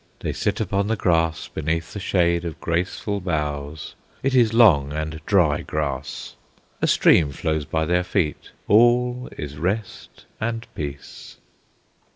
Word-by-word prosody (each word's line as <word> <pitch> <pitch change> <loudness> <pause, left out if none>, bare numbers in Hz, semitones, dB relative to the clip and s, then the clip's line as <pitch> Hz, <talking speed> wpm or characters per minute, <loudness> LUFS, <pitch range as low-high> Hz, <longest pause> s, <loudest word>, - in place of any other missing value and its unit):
They - - -2
sit - - -1
upon 100 +1 0
the 115 - +1
grass 80 -4 +1
beneath 80 +1 -3
the 100 - -5
shade 85 -3 +1
of 85 -2 -6
graceful 90 +4 -2
boughs; 75 -3 -3 0.3
it 135 0 +1
is 120 -4 +4
long 90 - +5
and 80 +1 -4
dry 85 -8 +3
grass. 70 -3 -4 0.5
A - - +2
stream 75 -5 +4
flows 80 +1 -2
by 80 +3 -1
their 90 +2 +1
feet. 90 -4 -2 0.2
All 120 +3 +3
is 75 -2 -6
rest 95 +5 -4
and 115 +1 -3
peace. 70 -2 -8
85 Hz, 140 wpm, -23 LUFS, 75-100 Hz, 0.5 s, long